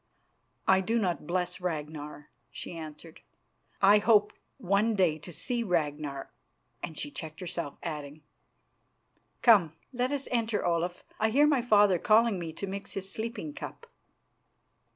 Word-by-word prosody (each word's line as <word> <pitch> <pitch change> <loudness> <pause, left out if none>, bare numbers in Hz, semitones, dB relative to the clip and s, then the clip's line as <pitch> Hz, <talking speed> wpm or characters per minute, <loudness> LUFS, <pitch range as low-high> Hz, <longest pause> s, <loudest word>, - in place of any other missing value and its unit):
"I 190 0 +5
do 225 +5 0
not 180 -8 -1
bless 180 +1 -1
Ragnar," 150 -3 -5 0.2
she - - -8
answered. 155 0 -9 0.6
"I 205 +2 +7
hope 210 -1 +4 0.2
one 210 0 +2
day 175 -5 +2
to 175 - -9
see 240 - -2
Ragnar 150 -7 -2 0.3
" - - -45
and 160 - -5
she 290 - -4
checked 160 - -7
herself, 170 -5 -5
adding: 150 -2 -6 1.2
"Come, 195 -10 +6 0.2
let 250 +1 0
us 280 -1 -2
enter, 230 -3 0
Olaf. 175 +1 -1 0.2
I 220 - +3
hear 280 +6 +5
my 290 -4 +3
father 205 -6 +4
calling 220 0 +4
me 165 -2 -4
to 180 - -5
mix 195 +1 -6
his 195 0 -5
sleeping 230 +8 -5
cup." 320 +8 -8
190 Hz, 145 wpm, -29 LUFS, 160-225 Hz, 1.2 s, I